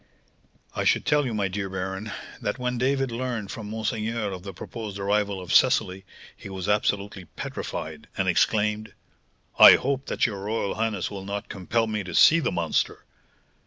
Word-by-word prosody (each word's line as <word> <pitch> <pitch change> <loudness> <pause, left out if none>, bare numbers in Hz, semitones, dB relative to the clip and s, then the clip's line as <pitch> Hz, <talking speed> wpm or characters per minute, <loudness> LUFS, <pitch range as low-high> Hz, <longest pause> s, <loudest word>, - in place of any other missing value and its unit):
"I - - -1
should - - +2
tell 150 -2 +2
you, 120 - -3
my 100 -2 +1
dear 95 +1 -4
baron, 95 +3 -4 0.3
that 105 - -2
when 125 -1 -2
David 135 0 +1
learned 115 -4 -3
from 105 -2 -7
monseigneur 110 0 -2
of 95 -1 -6
the 95 +1 -7
proposed 105 +3 -7
arrival 100 0 0
of 90 -2 -4
Cecily, 95 +1 +3 0.3
he - - -10
was 95 -1 -5
absolutely 105 -2 0
petrified, 80 -2 -6
and - - 0
exclaimed, 105 0 +1 0.6
'I - - +12
hope 135 0 0
that - - +1
your 105 -4 -2
royal 105 0 -2
highness 110 -4 -2
will 100 -2 -6
not 100 +1 -5
compel 110 +4 0
me 105 -2 -2
to 90 -2 -6
see 165 - +7
the 155 - 0
monster?' 85 -2 -1
105 Hz, 170 wpm, -25 LUFS, 95-115 Hz, 0.6 s, I